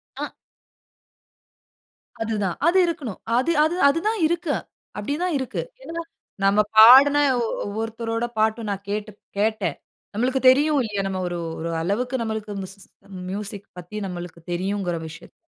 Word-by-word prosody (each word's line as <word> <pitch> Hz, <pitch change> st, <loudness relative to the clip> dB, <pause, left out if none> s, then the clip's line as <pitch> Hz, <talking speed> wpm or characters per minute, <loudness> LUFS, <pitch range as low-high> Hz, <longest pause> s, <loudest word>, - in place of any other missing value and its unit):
அ. -, -, -5 dB, 1.9 s
அதுதான். 210 Hz, -5 st, -1 dB
அது 365 Hz, +3 st, +4 dB
இருக்கணும். 295 Hz, -, -4 dB, 0.2 s
அது 325 Hz, +7 st, +2 dB
அது 315 Hz, +3 st, +1 dB
அதுதான் 415 Hz, +8 st, 0 dB
இருக்கு. 340 Hz, -2 st, -1 dB, 0.4 s
அப்படி 210 Hz, +8 st, -2 dB
தான் 355 Hz, -4 st, 0 dB
இருக்கு. 260 Hz, -, -3 dB, 0.2 s
ஏன்னா, 335 Hz, +1 st, -5 dB, 0.4 s
நம்ம 200 Hz, +2 st, +4 dB, 0.2 s
பாடுன 265 Hz, +6 st, +9 dB, 0.2 s
ஒ -, -, 0 dB, 0.2 s
ஒவ்வொருத்தரோட 225 Hz, +2 st, -3 dB
பாட்டு, 220 Hz, +1 st, +2 dB
நான் 200 Hz, 0 st, -3 dB
கேட்டு 210 Hz, +1 st, -3 dB, 0.3 s
கேட்டேன். 210 Hz, -7 st, 0 dB, 0.4 s
நம்மளுக்கு 255 Hz, +5 st, 0 dB
தெரியும் 290 Hz, +2 st, +4 dB
இல்லையா? 205 Hz, -3 st, -2 dB
நம்ம 190 Hz, -1 st, -3 dB
ஒரு 175 Hz, 0 st, -3 dB, 0.2 s
ஒரு 165 Hz, +1 st, -3 dB
அளவுக்கு, 245 Hz, +9 st, -1 dB
நம்மளுக்கு 220 Hz, -2 st, -3 dB
மிசிஸ் 195 Hz, +1 st, -6 dB, 0.4 s
மியூசிக் 200 Hz, 0 st, -4 dB
பத்தி, 180 Hz, +4 st, -8 dB
நம்மளுக்கு 175 Hz, -2 st, -7 dB
தெரியுங்கிற 185 Hz, 0 st, -1 dB
விஷயத்த. 160 Hz, -, -12 dB
220 Hz, 130 wpm, -23 LUFS, 195-265 Hz, 1.9 s, பாடுன